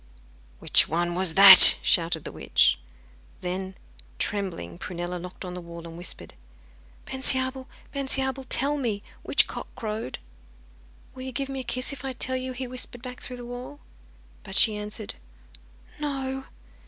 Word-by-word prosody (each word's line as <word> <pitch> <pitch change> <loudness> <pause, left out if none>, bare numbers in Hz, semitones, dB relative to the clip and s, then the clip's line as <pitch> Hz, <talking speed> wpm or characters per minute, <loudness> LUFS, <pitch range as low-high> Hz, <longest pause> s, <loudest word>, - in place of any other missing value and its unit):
'Which - - +4
one 175 +2 -2
was 180 -2 0
that?' 195 -1 +12
shouted 165 -2 +1
the - - -7
witch. - - +1 0.6
Then, 185 +1 -5 0.4
trembling, 175 - -5
Prunella 175 0 -6
knocked 180 +2 -10
on 180 - -7
the 180 - -7
wall 170 0 -11
and 165 -1 -10
whispered: 175 +1 -9 0.7
'Bensiabel, 260 0 -2 0.3
Bensiabel, 265 -1 -3
tell 285 +3 +1
me, 225 -7 -3 0.2
which - - +2
cock - - -8
crowed?' 220 - -5 1.0
'Will 255 - -11
you 260 0 -6
give 270 +3 -4
me 270 -1 -5
a - - -5
kiss 255 +3 -3
if 265 -1 -10
I 265 -1 -4
tell 260 +1 -1
you?' 255 0 -4
he 260 +1 -6
whispered 250 -1 -6
back 250 -1 -8
through 250 - -8
the 245 - -10
wall. 245 - -9 0.6
But 195 - -10
she 215 -2 +4
answered 210 0 -7 0.9
'No. 270 -2 -4
235 Hz, 155 wpm, -25 LUFS, 180-260 Hz, 1.0 s, that